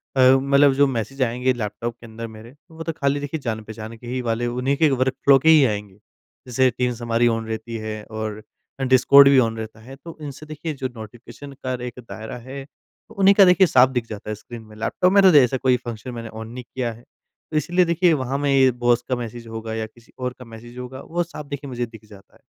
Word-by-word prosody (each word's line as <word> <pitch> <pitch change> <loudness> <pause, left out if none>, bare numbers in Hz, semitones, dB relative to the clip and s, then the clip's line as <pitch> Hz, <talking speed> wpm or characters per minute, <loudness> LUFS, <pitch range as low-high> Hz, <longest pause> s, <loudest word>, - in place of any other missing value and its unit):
अ, - - 0
मतलब 135 +2 +5
जो 140 +1 +4
मैसेज 130 +2 -4
आएँगे 125 +2 0
लैपटॉप 115 +1 -4
के 115 - -13
अंदर 115 +1 -7
मेरे, 110 +4 -13 0.2
वो 165 0 -8
तो 165 - -2
खाली 140 -2 0
देखिए 145 +2 -4
जान 110 -4 -3
पहचान 110 +1 -8
के 120 - -12
ही 125 +1 -2
वाले 115 0 -1
उन्हीं 125 +3 -1
के 155 -2 +4
वर्क 130 0 +1
फ़्लो 140 -1 +8
के 160 - +3
ही 155 -3 +7
आएँगे। 105 -3 -4 0.5
जैसे 130 +1 +3
टीम्स 125 -1 -1
हमारी 120 0 +2
ऑन 115 -1 -1
रहती 110 +1 -5
है 110 -1 -6
और 110 -1 -5 0.4
अ, 135 - -2
डिस्कॉर्ड 130 +2 +7
भी 135 -1 +6
ऑन 115 -2 +1
रहता 110 0 -7
है। 130 +4 -11
तो 165 +4 -12
इनसे 145 +1 -8
देखिए 155 +1 -5
जो 135 -2 -4
नोटिफ़िकेशन 120 +6 -11
का 130 - -1
एक 125 0 -8
दायरा 110 +2 -7
है, 135 +3 -9 0.4
उन्हीं 195 0 +4
का 195 -1 +8
देखिए 180 +1 +5
साफ़ 130 -3 +5
दिख 125 -3 -2
जाता 105 0 -7
है 110 - -2
स्क्रीन 115 +2 -11
में। 110 -1 -15
लैपटॉप 180 +11 +1
में 200 - +7
तो 185 -3 +7
ऐसा 130 -1 +4
कोई 125 -1 +2
फंक्शन 120 +2 -6
मैंने 115 -1 -7
ऑन 110 0 -8
नहीं 125 +1 -8
किया 125 -3 -1
है। 115 +2 -16 0.5
तो 155 - 0
इसलिए 175 +4 +2
देखिए 170 +1 +3
वहाँ 135 -1 -1
में 145 0 -1
ये 135 -1 +5
बॉस 120 0 +1
का 125 - +1
मैसेज 120 -1 -7
होगा 110 0 -6
या 110 0 -3
किसी 115 +1 -19
और 125 0 -3
का 125 - -10
मैसेज 115 +2 -12
होगा 125 +1 -7
वो 175 +1 -2
साफ़ 155 -3 -9
देखिए 140 0 -6
मुझे 125 -2 -3
दिख 110 -2 -15
जाता 100 -2 -17
है। - - -23
125 Hz, 240 wpm, -22 LUFS, 115-140 Hz, 0.5 s, फ़्लो